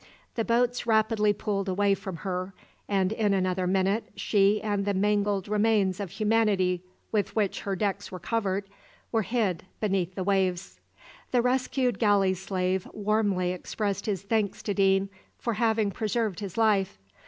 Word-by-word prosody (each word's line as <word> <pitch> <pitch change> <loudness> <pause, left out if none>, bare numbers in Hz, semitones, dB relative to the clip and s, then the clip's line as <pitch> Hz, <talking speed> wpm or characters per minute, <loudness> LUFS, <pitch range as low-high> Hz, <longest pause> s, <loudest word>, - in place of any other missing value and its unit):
The 225 - -1
boats 240 +1 +1
rapidly 220 -1 +3
pulled 200 -1 -2
away 200 +2 +2
from 190 -2 -5
her, 185 0 -3 0.3
and 195 -1 +1
in 210 -2 +1
another 185 -1 0
minute 195 +4 +1
she 200 0 +3
and 205 -2 -1
the 200 0 0
mangled 205 0 +1
remains 210 -3 +2
of 200 -3 -4
humanity 210 -4 +1 0.3
with 210 -2 0
which 210 -3 0
her 195 -1 -2
decks 200 +1 -2
were 185 - -5
covered 195 +1 -1 0.5
were 225 - +2
hid 200 -5 -1
beneath 190 -4 -1
the 190 - -2
waves. 190 -2 0 0.5
The 245 -2 +2
rescued 250 -2 +1
galley 200 -4 +3
slave 185 0 -2
warmly 205 -4 +1
expressed 200 +3 -3
his 195 -3 -1
thanks 210 -1 -1
to 205 - -1
Deane 195 0 +3 0.3
for 235 - -2
having 220 -2 +1
preserved 215 -1 -1
his 200 -2 -6
life. 205 - +2
200 Hz, 155 wpm, -27 LUFS, 190-220 Hz, 0.5 s, rapidly